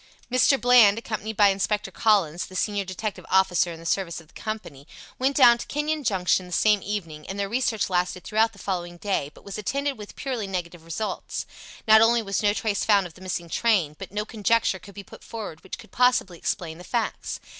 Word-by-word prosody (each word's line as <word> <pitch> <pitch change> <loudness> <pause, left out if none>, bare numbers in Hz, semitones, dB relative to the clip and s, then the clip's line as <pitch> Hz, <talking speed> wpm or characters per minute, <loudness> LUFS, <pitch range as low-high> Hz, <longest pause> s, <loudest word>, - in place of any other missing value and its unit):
Mr. 255 +2 +4
Bland, 240 -4 +6
accompanied 220 -2 -5
by 205 -1 +6
Inspector 195 +2 -1
Collins, 185 -7 +2
the 185 - -12
senior 205 +1 0
detective 190 +3 -5
officer 185 -2 +3
in 165 - -9
the 165 - -13
service 170 -1 -1
of 160 -2 -17
the - - -24
company, 190 -11 -7 0.3
went 270 +2 +1
down 240 -3 +7
to - - -7
Kenyon 300 +1 -2
Junction 185 -4 +1
the - - -13
same 210 +2 +3
evening, 165 -7 -5
and 195 - -4
their 200 - 0
research 230 -1 0
lasted 180 0 -1
throughout 220 +2 +2
the 210 - -19
following 175 -3 -4
day, 190 -7 -1
but - - -17
was 200 +1 -6
attended 275 +4 -2
with 210 - -10
purely 250 -7 -3
negative 175 -3 -5
results. 170 +6 -4 0.4
Not 220 0 +8
only 230 +1 +4
was 195 -1 -1
no 205 -1 +3
trace 205 0 -1
found 200 -3 +4
of 175 - -9
the 180 - -17
missing 180 -2 -4
train, 175 -5 +1
but 195 - -8
no 210 +1 -2
conjecture 220 -2 +1
could 200 +2 -14
be 200 - -8
put - - -14
forward 210 -8 -7
which 190 - -7
could - - -15
possibly 250 -9 +2
explain 165 -1 -3
the - - -10
facts. 235 +3 -3
200 Hz, 210 wpm, -25 LUFS, 180-225 Hz, 0.4 s, Not